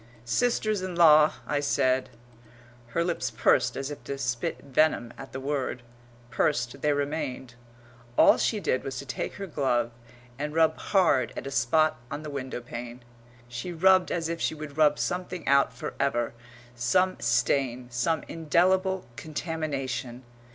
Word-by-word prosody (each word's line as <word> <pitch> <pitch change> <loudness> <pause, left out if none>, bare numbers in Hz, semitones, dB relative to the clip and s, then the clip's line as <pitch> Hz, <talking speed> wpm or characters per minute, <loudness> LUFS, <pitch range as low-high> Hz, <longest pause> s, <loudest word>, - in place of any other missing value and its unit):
"Sisters 215 - +1
in 185 -1 -4
law," 155 -3 +7
I 145 +3 0
said 130 -2 +1 0.8
Her 165 +9 0
lips 170 0 -1
pursed - - +2
as 135 +1 -4
if 145 - -8
to 140 - -4
spit 120 -3 -2
venom 135 -4 +1
at 135 - -10
the 130 - -5
word; 135 -3 -3 0.5
pursed 125 0 0
they 150 - +2
remained. 140 -3 -3 0.6
All - - +6
she 215 - +1
did 130 -9 0
was 135 -1 -5
to 140 - -6
take 130 - -4
her 200 - -5
glove 125 -8 0 0.5
and 150 +1 -3
rub 160 -1 +4
hard 140 - +2
at - - -5
a 140 - -5
spot 155 +6 +2
on 145 +2 -5
the 150 - -6
window 130 -3 -5
pane. 120 0 -8 0.4
She 120 +9 -5
rubbed 185 +2 +4
as 165 -2 -1
if 170 0 -4
she - - 0
would 150 -2 -8
rub 150 -1 +4
something 180 -1 -3
out 140 0 +4
for - - -6
ever 120 -4 0 0.4
some 150 +11 +1
stain, 125 +1 +1
some 140 +7 0
indelible 185 +4 +1
contamination. 135 -4 -4
145 Hz, 155 wpm, -27 LUFS, 125-165 Hz, 0.8 s, law